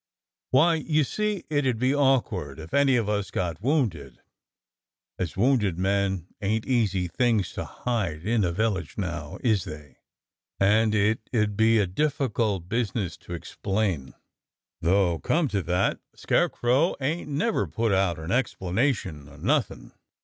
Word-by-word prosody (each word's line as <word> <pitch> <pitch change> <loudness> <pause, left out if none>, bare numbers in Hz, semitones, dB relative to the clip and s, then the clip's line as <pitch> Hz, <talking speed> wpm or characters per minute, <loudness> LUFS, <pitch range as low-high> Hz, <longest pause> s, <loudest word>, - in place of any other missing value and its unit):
"Why, 160 +6 +5
you 155 -1 +1
see 210 +6 -2
it 145 -3 0
'ud 125 -3 +1
be 130 +4 +2
awkward 120 - +1
if 80 0 -10
any 140 -2 +4
of 115 -4 +1
us 105 -2 -1
got 90 -3 -3
wounded, 110 - -1 1.0
as 90 -1 -3
wounded 105 -6 +2
men 95 -1 0 0.2
ain't 105 +2 0
easy 105 -8 +1
things 110 +1 +1
to - - -4
hide 95 -10 -3
in 110 -1 +2
a 90 - +1
village 95 -3 -1
now, - - -4
is 110 -6 +2
they? 75 -4 -10 0.6
and 110 +2 +3
it 110 +2 +1
'ud 105 -2 +1
be 110 +2 +4
a 105 - +3
difficult 110 - -1
busi 115 0 -1
ness 95 -8 -2
to 85 - -7
explain. 95 -4 -2 0.7
Though, 85 -1 +2
come 165 -2 +1
to 100 -3 0
that. 90 +2 0 0.2
Scarecrow 130 +8 +1
ain't 150 +4 -2
never 155 +11 0
put 115 -2 -1
out 95 -3 +2
for 80 - -9
an 85 - -4
explanation 95 - -1
o' 70 - -14
nothing." - - -1
105 Hz, 150 wpm, -26 LUFS, 90-125 Hz, 1.0 s, Why